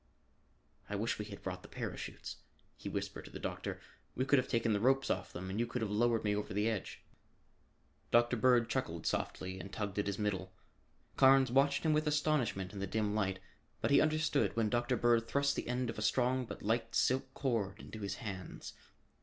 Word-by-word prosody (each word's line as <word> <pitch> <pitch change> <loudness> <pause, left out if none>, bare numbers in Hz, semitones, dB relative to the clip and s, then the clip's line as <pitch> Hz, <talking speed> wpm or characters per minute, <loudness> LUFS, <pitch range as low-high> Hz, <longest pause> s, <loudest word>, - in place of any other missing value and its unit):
"I 105 - -2
wish 110 +3 -1
we 105 - -3
had 100 -1 -10
brought 90 -1 -4
the - - -12
parachutes," - - -6 0.4
he - - -6
whispered - - -4
to - - -10
the - - -7
doctor. - - -4 0.4
"We 130 - 0
could 140 0 +5
have 130 - -2
taken 115 -2 +1
the 100 - +1
ropes 135 +4 +3
off 95 0 -2
them 95 +2 -6
and 100 - -2
you 120 - +1
could 120 0 -2
have 105 - -2
lowered 115 +2 +2
me 105 -1 +1
over 105 -1 -3
the 105 +2 +2
edge." 110 -4 -3 1.1
Dr. 120 +1 +4
Bird 120 0 +4
chuckled 85 - -2
softly 95 0 -2
and 100 - -8
tugged 105 -2 -3
at 105 - 0
his 100 - -1
middle. 95 -3 -2 0.6
Carnes 135 -1 +6
watched 135 +1 +3
him 160 -1 +3
with 155 0 +1
astonishment 145 -10 +1
in 100 - -6
the 100 - -2
dim 105 +1 0
light, 95 -3 0 0.4
but - - 0
he - - +7
understood 155 -6 +2
when 110 -2 +1
Dr. 120 +1 +1
Bird 115 -1 +3
thrust 140 0 +1
the - - -3
end 125 +1 -1
of 110 - -8
a - - -3
strong 125 +3 +2
but - - -8
light 115 +2 0
silk 130 +1 +2
cord 110 -7 -1
into 110 - -9
his 100 -1 -3
hands. 95 -5 -7
115 Hz, 205 wpm, -34 LUFS, 100-130 Hz, 1.1 s, he